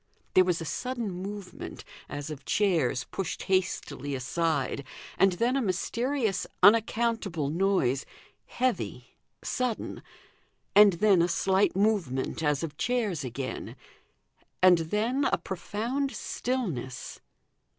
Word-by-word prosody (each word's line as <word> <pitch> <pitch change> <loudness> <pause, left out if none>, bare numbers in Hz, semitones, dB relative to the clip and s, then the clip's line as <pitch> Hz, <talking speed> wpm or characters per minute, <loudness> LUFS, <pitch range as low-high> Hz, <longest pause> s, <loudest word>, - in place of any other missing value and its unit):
There 185 - +7
was 180 -2 0
a 165 - -5
sudden 240 +3 -3
movement, 195 +2 -7 0.3
as 145 +2 -5
of 140 -3 -8
chairs 165 -11 +1
pushed 190 -4 -3
hastily 180 -7 -1
aside, 140 +1 -1 0.3
and 195 0 +4
then 235 +8 +1
a 275 - +2
mysterious 225 +2 -1 0.2
unaccountable 215 -7 +3
noise 165 -7 +1 0.4
heavy, 255 -1 -2 0.3
sudden; 250 -3 -2 0.7
and 205 -2 +8
then 190 0 +4
a 170 - +3
slight 190 +3 +2
movement 190 - 0
as 150 -1 +1
of 155 -2 -5
chairs 220 - 0
again; 130 +1 -5 0.9
and 180 -2 +7
then 240 +8 +1
a - - +2
profound 230 +9 -3
stillness. 240 - -3
190 Hz, 110 wpm, -28 LUFS, 160-225 Hz, 0.9 s, and